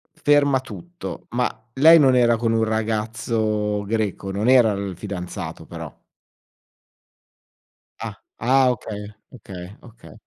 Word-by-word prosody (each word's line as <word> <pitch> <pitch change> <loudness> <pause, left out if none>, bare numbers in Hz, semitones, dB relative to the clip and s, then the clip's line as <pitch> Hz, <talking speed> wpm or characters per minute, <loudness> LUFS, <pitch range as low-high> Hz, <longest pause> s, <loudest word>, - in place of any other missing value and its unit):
Ferma 145 -3 +3
tutto! 175 +6 -9
Ma, 125 +1 0 0.2
lei 160 +5 +7
non 130 -3 +5
era 120 -2 +4
con 115 0 0
un 115 0 +2
ragazzo 110 -1 -1
greco? 100 -2 -2
Non 105 +4 -1
era 125 -4 +6
il 100 -2 -4
fidanzato 90 -2 -6
però? - - -8 2.1
Ah. - - -5 0.2
Ah! 130 +2 +4
okay, 105 -3 -6 0.3
okay, 95 -4 -10
okay. 115 -1 -15
115 Hz, 115 wpm, -22 LUFS, 105-125 Hz, 2.1 s, lei